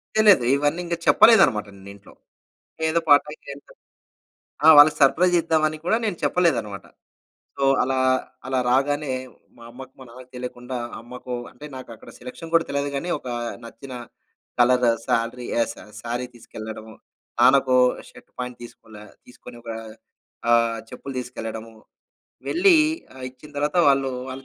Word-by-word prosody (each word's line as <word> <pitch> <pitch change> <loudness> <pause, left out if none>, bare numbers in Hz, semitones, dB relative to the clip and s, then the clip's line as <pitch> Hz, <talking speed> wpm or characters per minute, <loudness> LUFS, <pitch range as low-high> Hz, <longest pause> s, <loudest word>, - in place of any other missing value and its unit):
తెలీదు. 210 - +5
ఇవన్నింక 170 +4 -1
చెప్పలేదనమాట. 130 - +5
నేను 95 +1 -13
ఇంట్లో. 100 - -18 0.8
ఏదో 170 +1 +1
పార్ 145 0 +7
టైమ్ 150 - -10
చేద్దాం. 140 0 -11 0.9
ఆ! - - +6
వాళ్ళకి 150 +1 +7
సర్ప్రైజ్ 175 +6 +4
ఇద్దామని 155 -1 0
కూడా 220 - +2
నేను 200 -6 -2
చెప్పలేదనమాట. 130 - 0 0.7
సో, 140 - -3 0.2
అలా 130 +1 -1 0.5
అలా 130 -1 0
రాగానే 145 +2 +1 0.5
మా 115 - -14
అమ్మకు 130 +1 -11
మా - - -10
నాన్నకు 125 +1 -14
తెలీకుండా 125 0 -7 0.2
అమ్మకు 125 +1 -9 0.2
అంటే 145 +4 -12
నాకక్కడ 115 -4 -11
సెలక్షన్ 165 +6 -10
కూడా 165 0 +4
తెలీదు 140 0 -2
కానీ, 175 +6 -3
ఒకా 125 -1 -6 0.3
నచ్చిన 130 +3 -11 0.7
కలర్ 125 0 +4 0.2
సాలరీ 115 +2 -1
ఆహ్, - - +1
స - - -23 0.3
సారీ 120 +2 -4
తీసుకెళ్లడం. 110 -1 -9 0.5
నాన్నకు 130 0 +5 0.3
షర్ట్, - - -18
ప్యాంట్ 125 -1 -6
తీసుకోలే 110 -2 -13 0.2
తీసుకొని 125 -1 -13
ఒక 115 - -6 0.8
ఆహ్, 115 -1 +3
చెప్పులు 135 - -8
తీసుకెళ్లడము. 115 -2 -7 0.8
వెళ్ళి 355 0 +4 0.4
ఆహ్, 130 -1 -9
ఇచ్చిన 140 +4 -16
తర్వాత 150 +4 0
వాళ్ళు 135 -1 +2 0.2
వాళ్ళు 130 +1 -8
130 Hz, 135 wpm, -23 LUFS, 120-150 Hz, 0.9 s, పార్